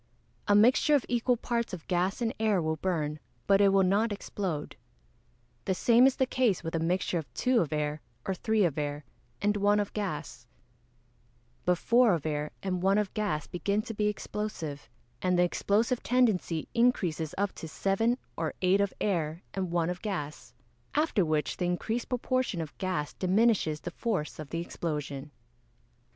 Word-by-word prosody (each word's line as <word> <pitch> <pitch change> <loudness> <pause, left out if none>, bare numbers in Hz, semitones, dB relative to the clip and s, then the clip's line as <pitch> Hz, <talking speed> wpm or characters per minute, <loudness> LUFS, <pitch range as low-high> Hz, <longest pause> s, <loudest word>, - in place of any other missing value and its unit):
A 205 - +5
mixture 250 +7 +5
of 275 - +1
equal 245 0 +1
parts 235 -2 -2
of 170 -3 -6
gas 185 +5 0
and 225 - 0
air 215 -3 +2
will 160 -1 -1
burn, 155 -4 -1 0.3
but 195 0 +4
it 200 - +6
will 195 0 +4
not 205 +4 +2
explode. 190 -6 -4 0.9
The 190 - +1
same 240 +6 +5
is 270 - +1
the 260 - +2
case 250 -8 +1
with 165 - -4
a 165 - 0
mixture 175 +1 0
of 155 - -9
two 250 -1 +3
of 160 - -2
air, 150 0 -1 0.2
or 190 - 0
three 220 +3 +1
of 155 -3 -1
air, 145 0 -3 0.4
and 205 0 +2
one 205 +1 +3
of 205 -1 -2
gas; 150 - -4 1.2
but 180 0 +3
four 235 -1 +4
of 160 - -6
air 150 -1 -1
and 185 -2 -1
one 195 +2 +3
of 210 -2 0
gas 205 -8 -1
begin 200 +3 -1
to 225 - -6
be 210 0 0
explosive, 205 -8 -4 0.3
and 180 -1 +2
the 175 - +5
explosive 215 +7 +1
tendency 215 -10 +1
increases 180 -10 +1
up 200 0 0
to 160 - -8
seven 210 +9 +1 0.2
or 160 -2 -3
eight 190 +2 +4
of 200 -2 -1
air 170 -4 -1
and 190 -2 -2
one 170 0 +1
of 180 - -6
gas, 150 - -5 0.4
after 300 - +2
which 155 -3 0
the 180 - -1
increased 220 +7 -2
proportion 250 -5 0
of 160 -2 -5
gas 185 -6 -2
diminishes 190 -5 +2
the 175 - -5
force 190 -9 -2
of 155 -2 -7
the 165 - -2
explosion. 150 -4 -4
190 Hz, 175 wpm, -29 LUFS, 160-215 Hz, 1.2 s, it